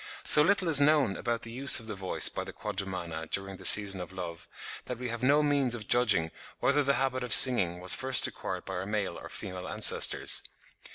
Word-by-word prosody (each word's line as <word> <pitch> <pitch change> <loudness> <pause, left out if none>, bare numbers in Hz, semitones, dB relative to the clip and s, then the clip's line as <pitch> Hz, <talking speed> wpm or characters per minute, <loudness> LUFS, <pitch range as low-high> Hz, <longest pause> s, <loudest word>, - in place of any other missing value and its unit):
So 150 - +4
little 190 +2 -1
is 150 -4 +5
known 140 -8 0
about 120 -1 -6
the 115 - -10
use 135 +3 +4
of 115 - -13
the 110 - -6
voice 95 -2 +1
by - - -5
the - - -11
Quadrumana 90 -6 -7
during 95 0 -5
the - - -12
season 100 -3 +4
of 90 - -11
love, 85 -3 -10 0.4
that 125 - -8
we 125 0 -8
have 120 +1 -8
no 145 +4 +1
means 140 -4 -1
of 105 -4 -11
judging 100 -10 0 0.3
whether 140 +3 -1
the 140 0 -1
habit 130 -1 -4
of 120 -4 +5
singing 95 -10 +6
was 90 +1 +4
first 130 0 +3
acquired - - -7
by 95 - -9
our 95 +2 -7
male 105 -4 -5
or - - -13
female 95 -2 -9
ancestors. - - +2
110 Hz, 215 wpm, -26 LUFS, 95-130 Hz, 0.4 s, singing